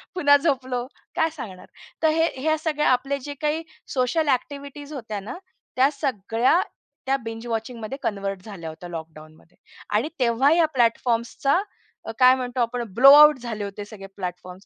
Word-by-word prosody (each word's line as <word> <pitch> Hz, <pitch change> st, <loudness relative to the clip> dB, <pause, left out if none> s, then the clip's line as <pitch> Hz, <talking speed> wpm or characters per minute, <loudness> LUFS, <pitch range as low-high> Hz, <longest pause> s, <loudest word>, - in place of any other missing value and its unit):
पुन्हा 285 Hz, -5 st, +5 dB
झोपलो. 260 Hz, -4 st, -1 dB, 0.3 s
काय 320 Hz, -, +2 dB
सांगणार? 190 Hz, -9 st, -8 dB, 0.4 s
तर 320 Hz, -, +5 dB
हे 325 Hz, -, +4 dB
हे 315 Hz, +2 st, +2 dB
सगळे 300 Hz, -1 st, -1 dB
आपले 270 Hz, +3 st, +1 dB
जे 290 Hz, -, -4 dB
काही 305 Hz, +2 st, 0 dB, 0.3 s
सोशल 275 Hz, +5 st, +1 dB
ॲक्टिव्हिटीज 285 Hz, +2 st, -3 dB
होत्या 225 Hz, -7 st, -5 dB
ना, 205 Hz, -, -7 dB, 0.4 s
त्या 260 Hz, +2 st, +4 dB
सगळ्या 260 Hz, -, +1 dB, 0.5 s
त्या 270 Hz, +1 st, +2 dB
बिंज 225 Hz, +1 st, -6 dB
वॉचिंगमध्ये 230 Hz, +2 st, -4 dB
कन्व्हर्ट 195 Hz, -2 st, -3 dB
झाल्या 185 Hz, -7 st, -7 dB
होत्या 165 Hz, +3 st, -10 dB
लॉकडाउनमध्ये. 160 Hz, 0 st, -11 dB, 0.3 s
आणि 220 Hz, +9 st, 0 dB
तेव्हा 250 Hz, +3 st, +3 dB
या 335 Hz, 0 st, +4 dB
प्लॅटफॉर्म्सचा 235 Hz, +6 st, +1 dB, 0.5 s
अ, -, -, -3 dB
काय 255 Hz, 0 st, +7 dB
म्हणतो 250 Hz, -1 st, -3 dB
आपण 240 Hz, +1 st, -1 dB
ब्लो 270 Hz, +6 st, +8 dB
आउट 300 Hz, -1 st, +8 dB
झाले 230 Hz, -4 st, -5 dB
होते 200 Hz, +1 st, -7 dB
सगळे 205 Hz, -2 st, -11 dB
प्लॅटफॉर्म्स 180 Hz, +1 st, -7 dB
245 Hz, 155 wpm, -24 LUFS, 210-285 Hz, 0.5 s, ब्लो